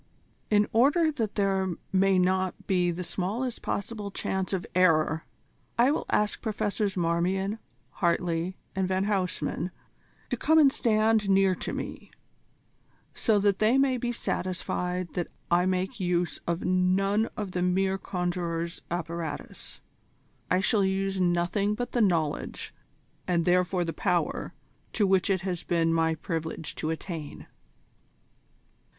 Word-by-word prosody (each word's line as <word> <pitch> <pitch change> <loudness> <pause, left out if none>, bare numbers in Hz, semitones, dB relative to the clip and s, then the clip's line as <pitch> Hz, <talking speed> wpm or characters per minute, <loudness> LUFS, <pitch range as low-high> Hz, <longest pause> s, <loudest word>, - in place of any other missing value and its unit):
"In 210 -1 +4
order 290 +8 +4
that 225 -8 -3
there 190 -3 +1 0.2
may 190 0 +4
not 185 0 +1
be 180 -2 +2
the 175 +1 -3
smallest 205 +8 -3
possible 205 0 -3
chance 190 -1 -2
of 190 -3 -1
error, 160 -3 +3 0.5
I 245 +4 +5
will 300 - -2
ask 210 -1 +1
Professors 210 -3 -1
Marmion, 185 +5 0 0.4
Hartley, 170 +1 0 0.2
and 190 -1 +1
Van 190 0 +1
Huysman 180 -4 -1 0.6
to - - 0
come 320 +1 +3
and 280 -4 +6
stand 215 -2 +2
near 195 -1 +4
to - - -4
me, - - -6 1.0
so 220 -3 +2
that 200 -1 +2
they 220 +4 +4
may 270 -2 +3
be 240 0 -2
satisfied 180 -4 -2
that 175 - -2 0.2
I 175 +1 +4
make 185 +5 -1
use 175 -3 0
of 170 +1 -1
none 190 +4 +2
of 205 -3 -3
the 180 - -2
mere 190 +2 +1
conjurer's 175 -3 -3
apparatus. 170 -2 -5 0.7
I 185 - +3
shall 200 +1 +2
use 190 0 0
nothing 180 +4 +1
but 245 +2 -4
the 240 - +1
knowledge, 165 -7 0 0.5
and 170 -2 +1
therefore 180 0 +2
the 165 - -3
power, 175 -1 -1 0.4
to 210 - +2
which 190 +1 +2
it 190 -2 +2
has 180 -3 -3
been 165 -2 +1
my 160 0 +2
privilege 160 -1 -4
to 155 - -2
attain." 160 -2 -5
185 Hz, 135 wpm, -28 LUFS, 175-205 Hz, 1.0 s, and